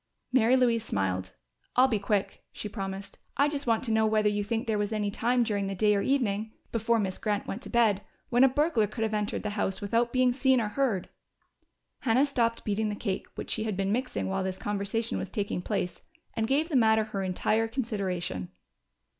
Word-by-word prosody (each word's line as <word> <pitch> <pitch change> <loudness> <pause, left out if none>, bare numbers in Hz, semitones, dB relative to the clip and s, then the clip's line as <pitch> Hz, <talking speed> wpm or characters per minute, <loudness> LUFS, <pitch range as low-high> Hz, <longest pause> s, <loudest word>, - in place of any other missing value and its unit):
Mary 250 0 +5
Louise 235 -3 +3
smiled. 95 - -2 0.4
"I'll 255 +1 +6
be 225 -5 0
quick," 200 0 -1
she - - -5
promised. 195 -1 -6 0.2
"I 285 - +5
just 290 -2 -3
want 230 +1 +2
to 235 - -1
know 220 0 +3
whether 215 -1 +3
you 205 0 -1
think 225 +2 -2
there 220 -2 0
was 205 +1 -1
any 210 -2 -1
time 240 +4 +2
during 205 -3 -1
the 195 - -3
day 210 +2 +3
or 200 - +1
evening 220 -5 0 0.2
before 230 +1 +1
Miss 190 -4 -2
Grant 210 -1 -1
went 220 - -5
to - - -8
bed 220 -5 +3 0.3
when 245 +2 +4
a 270 - +7
burglar 275 -5 +2
could 225 +2 -4
have 220 -1 -1
entered 210 0 -1
the 210 - -2
house 200 -2 -1
without 230 +4 +1
being 255 -1 +3
seen 265 0 +3
or 215 -2 -1
heard." 220 -6 0 0.9
Hannah 255 +3 +3
stopped 235 -5 0
beating 215 +1 0
the 205 - -2
cake 195 -3 -3
which - - -5
she 220 - -1
had 210 -4 -2
been 195 0 0
mixing 250 +3 -1
while 190 0 -1
this 190 0 -3
conversation 205 +3 -2
was - - -4
taking 205 -5 -2
place 180 0 -3 0.3
and 220 0 -1
gave 295 +6 +1
the 305 - -1
matter 220 -3 +5
her 210 -2 -4
entire 205 +4 +1
consideration. 195 - -3
220 Hz, 210 wpm, -28 LUFS, 200-235 Hz, 0.9 s, a